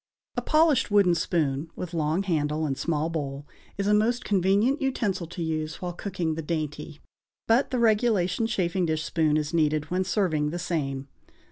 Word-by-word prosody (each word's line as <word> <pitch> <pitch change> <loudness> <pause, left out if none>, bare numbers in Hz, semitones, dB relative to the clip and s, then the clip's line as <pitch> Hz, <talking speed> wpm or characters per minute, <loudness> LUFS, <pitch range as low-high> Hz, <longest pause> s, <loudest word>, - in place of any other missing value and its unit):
A - - -1
polished 310 -5 +3
wooden 200 -4 +4
spoon, 160 -3 0
with 180 -1 -6
long 160 +3 0
handle 155 -3 0
and 140 -3 -1
small 155 +2 -1
bowl, 145 -4 -4 0.3
is 200 - -1
a 210 - +3
most 230 +4 +2
convenient 205 - +2
utensil 205 -10 -1
to 175 +1 -5
use 155 -1 -3
while 180 -1 -4
cooking 175 -3 -3
the 160 - -4
dainty; 155 -1 -4 0.5
but 230 +4 +3
the 255 - -1
regulation 220 -3 +2
chafing 185 -4 0
dish 155 0 -1
spoon 155 -2 +1
is 150 0 -2
needed 155 -1 +1
when 185 +1 +1
serving 175 -6 0
the 170 - -4
same. 140 -6 -3
170 Hz, 170 wpm, -26 LUFS, 155-200 Hz, 0.5 s, wooden